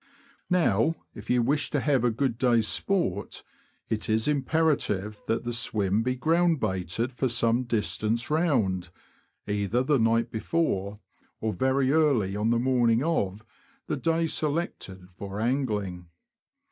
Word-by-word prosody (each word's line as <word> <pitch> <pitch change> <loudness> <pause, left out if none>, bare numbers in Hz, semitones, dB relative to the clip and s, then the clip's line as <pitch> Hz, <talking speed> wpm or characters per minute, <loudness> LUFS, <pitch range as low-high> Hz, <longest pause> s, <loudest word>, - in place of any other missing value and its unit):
Now, 165 - +2 0.2
if - - -11
you 125 -1 +3
wish 145 +4 0
to - - 0
have 135 -5 +1
a 120 - +4
good 120 0 -1
day's 120 -4 +3
sport, 195 - -1 0.4
it 110 -1 -3
is 110 +3 +2
imperative 140 - 0
that 115 +1 0
the 120 0 -3
swim 105 -3 0
be 125 +2 -1
ground 165 +3 +2
baited 95 +4 -2
for 130 +1 -1
some 120 +1 +1
distance 110 +1 -1
round, 110 - +1 0.6
either 105 +4 0
the 140 0 +2
night 115 +1 +2
before, 105 - -1 0.4
or 110 -1 -2
very 130 +6 +1
early 140 -11 +2
on 105 +2 0
the 120 - +3
morning 120 -1 +2
of, 110 - -1 0.4
the - - -2
day 165 0 0
selected 145 - -3
for 100 0 -6
angling. 105 -8 -1
120 Hz, 140 wpm, -27 LUFS, 105-140 Hz, 0.6 s, a